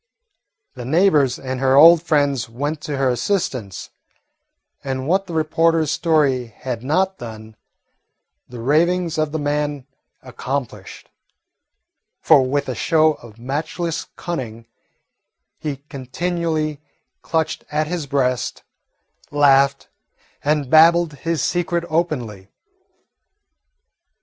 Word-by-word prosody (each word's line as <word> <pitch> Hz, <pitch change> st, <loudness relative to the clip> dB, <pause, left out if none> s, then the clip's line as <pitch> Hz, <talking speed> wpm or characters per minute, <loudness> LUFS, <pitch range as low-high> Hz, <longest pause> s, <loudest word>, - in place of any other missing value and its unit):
The 125 Hz, -, -8 dB
neighbours 150 Hz, -2 st, +3 dB
and 130 Hz, -1 st, -5 dB
her 135 Hz, 0 st, +3 dB
old 165 Hz, +3 st, +8 dB
friends 145 Hz, -7 st, 0 dB
went 145 Hz, +6 st, -4 dB
to 150 Hz, -2 st, -4 dB
her 135 Hz, 0 st, +1 dB
assistance, 125 Hz, -, -3 dB, 0.9 s
and 130 Hz, 0 st, -3 dB
what 190 Hz, +3 st, +1 dB
the 170 Hz, -, -7 dB
reporter's 160 Hz, 0 st, +2 dB
story 145 Hz, -6 st, +1 dB
had 115 Hz, +1 st, -6 dB
not 190 Hz, +7 st, 0 dB
done, 110 Hz, -2 st, -9 dB, 0.9 s
the 120 Hz, -2 st, -8 dB
ravings 165 Hz, +5 st, +1 dB
of 155 Hz, -1 st, 0 dB
the 160 Hz, -, -2 dB
man 145 Hz, -2 st, -2 dB, 0.4 s
accomplished; 125 Hz, -5 st, -6 dB, 1.1 s
for, -, -, +5 dB
with 140 Hz, +2 st, -1 dB
a 130 Hz, -, -2 dB
show 155 Hz, +7 st, +2 dB
of 115 Hz, -6 st, -15 dB
matchless 155 Hz, +6 st, -4 dB
cunning, 115 Hz, -9 st, -5 dB, 0.9 s
he 140 Hz, -2 st, -5 dB
continually 155 Hz, +2 st, -3 dB, 0.4 s
clutched 160 Hz, -1 st, -2 dB
at 155 Hz, +1 st, 0 dB
his 165 Hz, -2 st, -4 dB
breast, 130 Hz, -3 st, -1 dB, 0.7 s
laughed, 140 Hz, -1 st, +3 dB, 0.6 s
and 150 Hz, -1 st, +1 dB
babbled 165 Hz, 0 st, +5 dB
his 165 Hz, +3 st, -2 dB
secret 175 Hz, -1 st, -1 dB
openly. 125 Hz, -, -2 dB
145 Hz, 105 wpm, -20 LUFS, 130-165 Hz, 1.1 s, old